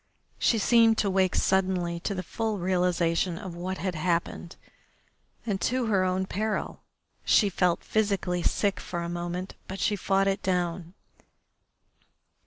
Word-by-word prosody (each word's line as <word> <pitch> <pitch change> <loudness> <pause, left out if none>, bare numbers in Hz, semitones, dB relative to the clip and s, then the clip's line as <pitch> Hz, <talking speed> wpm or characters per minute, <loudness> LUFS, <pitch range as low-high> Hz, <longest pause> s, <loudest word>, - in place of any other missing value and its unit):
She 230 - +3
seemed 225 +1 +4
to 200 - +1
wake 190 -1 +2
suddenly 185 -3 +1
to 200 +4 -3
the 185 - -3
full 220 +3 -2
realisation 175 -1 +1
of 190 -4 -7
what 185 +2 -4
had 185 -1 -2
happened 170 +1 -2 0.9
and 200 -4 -2
to 255 0 0
her 200 -4 +2
own 185 +1 0
peril. 215 +3 -3 0.4
She 205 - +4
felt 180 -1 +1
physically 200 -4 0
sick 200 +3 0
for 170 -1 -4
a 170 - -4
moment, 175 +2 -4
but 190 +1 -6
she 205 - +1
fought 195 0 +1
it 195 +1 0
down. 175 -1 -2
185 Hz, 145 wpm, -27 LUFS, 175-200 Hz, 0.9 s, seemed